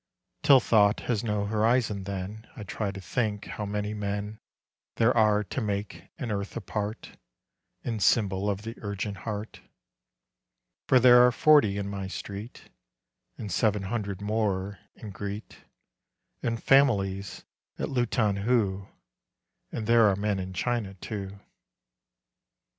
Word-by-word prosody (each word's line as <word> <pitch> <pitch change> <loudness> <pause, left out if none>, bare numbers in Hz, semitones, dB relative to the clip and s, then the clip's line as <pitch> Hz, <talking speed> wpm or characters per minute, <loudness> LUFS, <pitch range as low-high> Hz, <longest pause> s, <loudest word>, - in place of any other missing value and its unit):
Till 135 -2 +7
thought 105 -3 +3
has 115 -3 -1
no 105 -3 -1
horizon 110 -1 +1
then 100 +3 -6
I 110 - -7
try 105 0 -3
to 100 0 -6
think 105 +3 -2
how 105 - -5
many 105 +1 -2
men 105 0 -4 0.6
There 115 +2 +3
are 105 -2 +4
to 130 - -4
make 100 -4 -4
an 120 - -4
earth 100 +1 -3
apart 105 +1 -5 0.7
In 115 -2 -3
symbol 100 -1 +2
of 100 0 -2
the 115 +1 -5
urgent 100 0 -4
heart, 105 -1 -6 1.3
For 130 - +6
there 125 0 +8
are 125 - +6
forty 125 -7 +4
in 100 -1 -3
my 100 -1 -4
street, 100 +3 -8 0.7
And 105 -3 -6
seven 105 +1 +1
hundred 100 -2 -3
more 100 -3 -1 0.2
in 105 - -9
Greet, 100 +2 -7 0.8
And 115 -1 -2
families 100 -8 +2 0.3
at - - -2
Luton 120 -5 +1
Hoo, 100 -3 0 0.8
And 110 - -4
there 115 -1 +5
are 95 - +1
men 100 0 -1
in 95 0 -5
China, 105 0 -2
too. 100 0 -6
105 Hz, 135 wpm, -27 LUFS, 100-115 Hz, 1.3 s, there